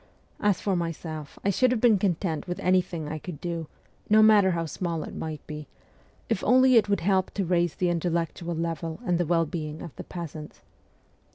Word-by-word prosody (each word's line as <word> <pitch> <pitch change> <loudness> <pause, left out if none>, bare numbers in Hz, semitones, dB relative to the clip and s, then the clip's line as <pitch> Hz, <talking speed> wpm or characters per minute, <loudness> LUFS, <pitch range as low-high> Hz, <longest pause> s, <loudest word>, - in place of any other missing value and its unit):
As 205 -3 +2
for 195 -2 0
my 170 -1 -1
self, 155 -2 -8
I 200 - +4
should 255 +7 +3
have 250 -2 +1
been 220 -4 +4
content 175 -4 -1
with 180 -1 -4
anything 180 -4 +1
I 155 +1 -4
could 155 -2 -8
do, 170 -2 -4 0.4
no 215 +1 +7
matter 210 -3 +6
how 170 -2 -1
small 165 0 -3
it - - -8
might 155 -2 -6
be, 150 -1 -7 0.6
if - - -1
only 255 +2 +5
it 215 -3 +5
would 200 -2 +1
help 190 0 +2
to 195 - 0
raise 175 -1 +1
the 180 - +1
intellectual 170 0 -1
level 165 0 -3
and 175 -3 +1
the 175 - 0
well 165 0 +3
being 155 -1 -5
of 170 - -9
the - - -6
peasants. 160 -3 -8
175 Hz, 200 wpm, -27 LUFS, 160-190 Hz, 0.6 s, no